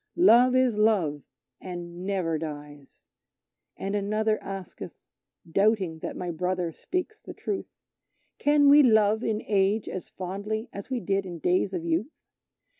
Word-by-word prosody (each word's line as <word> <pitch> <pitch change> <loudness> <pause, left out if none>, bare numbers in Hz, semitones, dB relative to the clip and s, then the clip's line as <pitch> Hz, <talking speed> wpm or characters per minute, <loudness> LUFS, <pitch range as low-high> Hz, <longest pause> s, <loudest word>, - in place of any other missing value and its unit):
Love 255 -7 +6
is 255 -4 +2
Love, 185 -10 +2 0.4
and 175 -1 -7
never 175 -5 -1
dies" 145 -2 -9 0.7
And 195 +1 -4
another 215 +2 0
asketh, 195 -2 -8 0.5
doubting 195 -2 +1
that - - -6
my 180 -1 -3
brother 180 0 -2
speaks 365 - -4
the - - -10
truth, 405 -2 -4 0.7
"Can 290 0 +4
we 290 +1 +8
love 220 -3 +4
in 220 -1 -1
age 200 +1 +1
as 185 - -6
fondly 205 +5 -4
as 200 +4 -8
we 255 -2 -1
did 195 +1 -1
in 175 -2 -6
days 180 +4 +1
of 175 -3 -4
youth? 170 - -2
195 Hz, 140 wpm, -27 LUFS, 175-220 Hz, 0.7 s, we